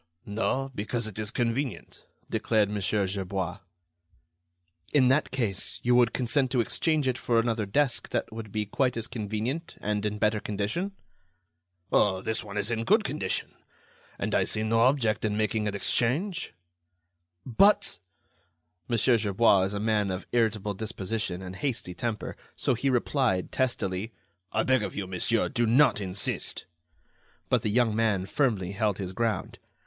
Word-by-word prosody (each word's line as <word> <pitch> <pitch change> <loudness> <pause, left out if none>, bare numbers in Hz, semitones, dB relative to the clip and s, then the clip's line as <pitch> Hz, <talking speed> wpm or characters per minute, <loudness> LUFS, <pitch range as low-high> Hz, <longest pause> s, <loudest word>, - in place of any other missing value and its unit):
"No; 130 +6 -1
because 115 +2 -2
it 110 0 -5
is 105 -1 -1
convenient," 120 - -3 0.2
declared 105 -3 +1
Mon. 105 -1 -2
Gerbois. 95 -2 -1 1.3
"In 130 -4 +5
that 145 +4 +3
case, 115 -8 -2
you 125 - +3
would 120 -2 +5
consent 130 +2 +1
to 130 -1 +1
exchange 150 +5 +1
it 130 -1 0
for 115 -1 +2
another 115 -2 0
desk 135 +4 +1
that - - -2
would 110 -2 -7
be 105 0 -1
quite 125 +4 0
as 115 - -2
convenient 115 +8 -4
and 105 0 -1
in 105 0 -1
better 105 0 +2
condition?" 105 - -2 1.0
"Oh! 95 -2 +3
this 110 +1 -1
one 105 -1 -7
is 105 +3 +1
in 115 -1 -1
good 215 - +4
condition, 120 - -2 0.6
and - - -2
I - - +4
see 110 - -1
no 115 +1 +2
object 115 -4 +3
in 105 -1 0
making 110 0 0
an 100 - -2
exchange." 145 - 0 0.9
"But——" 200 - +3 0.9
Mon. 120 - +1
Gerbois 105 -4 +4
is 95 - -2
a - - -2
man 105 -2 +1
of 95 0 -4
irritable 110 -3 +1
disposition 100 -2 -3
and 95 0 -7
hasty 110 -6 -2
temper. 115 +1 -4 0.2
So - - +1
he 130 +4 0
replied, 125 -6 +1
testily: 110 -5 -1 0.4
"I 110 - +1
beg 130 -2 +3
of 105 - -4
you, 100 - -2
monsieur, 95 +5 +1
do 120 0 0
not 120 -2 +4
insist." 95 0 -2 0.8
But 125 - +3
the 110 - -1
young 115 0 +2
man 110 -4 +1
firmly 105 -7 0
held 100 -1 0
his 95 -2 -5
ground. 110 -1 -2
110 Hz, 155 wpm, -28 LUFS, 100-125 Hz, 1.3 s, In